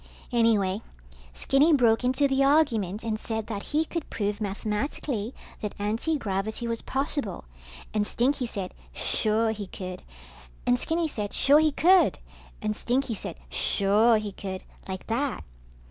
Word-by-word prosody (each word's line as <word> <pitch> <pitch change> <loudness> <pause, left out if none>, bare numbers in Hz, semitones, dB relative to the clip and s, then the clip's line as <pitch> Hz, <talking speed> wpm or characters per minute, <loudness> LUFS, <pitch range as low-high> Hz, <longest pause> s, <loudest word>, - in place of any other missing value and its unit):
Anyway, 220 -4 +2 0.5
Skinny 290 +4 +3
broke 235 -4 +4
into 260 +3 +3
the 270 0 +2
argument 230 - +2
and 220 -1 -2
said 220 -1 -3
that 210 -3 -4
he 305 +7 0
could 335 -1 -5
prove 205 0 -2
mathematically 215 +3 -2 0.3
that 210 -1 -5
antigravity 220 -1 -1
was 230 -1 -2
possible, 270 - -2 0.5
and 210 -1 +1
Stinky 255 +1 +1
said 195 -5 -5 0.2
suure 220 +1 +2
he 210 -2 -5
could, 185 -1 -7 0.6
and 125 - +3
Skinny 330 0 0
said 210 -8 -4
sure 285 +2 +6
he 310 -1 +3
could, 365 +6 +4 0.5
and 215 0 0
Stinky 250 +2 0
said 205 - -6 0.2
suuure 210 - +4
he 210 -1 -5
could, 190 -1 -6 0.2
like 190 -1 -5
that. 265 +5 -1
225 Hz, 140 wpm, -27 LUFS, 205-275 Hz, 0.6 s, sure